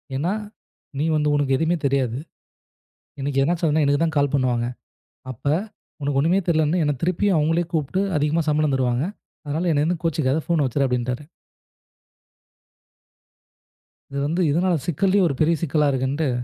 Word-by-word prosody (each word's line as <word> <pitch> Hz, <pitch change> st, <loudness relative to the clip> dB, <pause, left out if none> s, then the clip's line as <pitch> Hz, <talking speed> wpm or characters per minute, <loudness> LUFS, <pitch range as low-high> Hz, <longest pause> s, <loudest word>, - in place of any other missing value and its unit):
ஏன்னா, 165 Hz, +8 st, 0 dB, 0.7 s
நீ 150 Hz, -, +1 dB
வந்து 150 Hz, -1 st, +1 dB
உனக்கு 140 Hz, -2 st, +2 dB
எதுவுமே 160 Hz, +4 st, +1 dB
தெரியாது. 130 Hz, -4 st, +1 dB, 1.0 s
எனக்கு 135 Hz, 0 st, -2 dB
ஏதாவது 170 Hz, +4 st, 0 dB
ஆச்சுனா, 155 Hz, 0 st, +2 dB
எனக்குத்தான் 155 Hz, +3 st, +1 dB
கால் 140 Hz, -1 st, +1 dB
பண்ணுவாங்க. 125 Hz, -3 st, +1 dB, 0.7 s
அப்ப 125 Hz, -, -14 dB, 0.6 s
உனக்கு 140 Hz, -1 st, 0 dB
ஒண்ணுமே 170 Hz, +7 st, +3 dB
தெரியலைன்னு 160 Hz, +1 st, +2 dB
என்னைத் 145 Hz, -3 st, -1 dB
திருப்பியும் 180 Hz, +1 st, +2 dB
அவங்களே 165 Hz, +3 st, +1 dB
கூப்பிட்டு 160 Hz, +4 st, 0 dB, 0.2 s
அதிகமா 150 Hz, +3 st, +1 dB
சம்பளம் 150 Hz, -1 st, +1 dB
தருவாங்க. 125 Hz, 0 st, 0 dB, 0.4 s
அதனால 160 Hz, +5 st, -1 dB
என்ன 145 Hz, -1 st, +2 dB
எதுவும் 170 Hz, 0 st, -1 dB
கோச்சுக்காத. 155 Hz, -4 st, +1 dB
போன் 170 Hz, -4 st, +2 dB
வச்சுடு 135 Hz, +2 st, 0 dB
அப்படின்னுட்டாரு. 125 Hz, +2 st, -2 dB, 2.9 s
இது 140 Hz, 0 st, -4 dB
வந்து, 170 Hz, +5 st, 0 dB
இதனால் 170 Hz, -1 st, +1 dB
சிக்கல் 185 Hz, +4 st, +1 dB
ஒரு 150 Hz, -, -1 dB
பெரிய 165 Hz, +2 st, +4 dB
சிக்கலா 150 Hz, -1 st, +2 dB
இருக்குன்னுட்டு. 135 Hz, +3 st, -1 dB
150 Hz, 140 wpm, -22 LUFS, 135-165 Hz, 2.9 s, பெரிய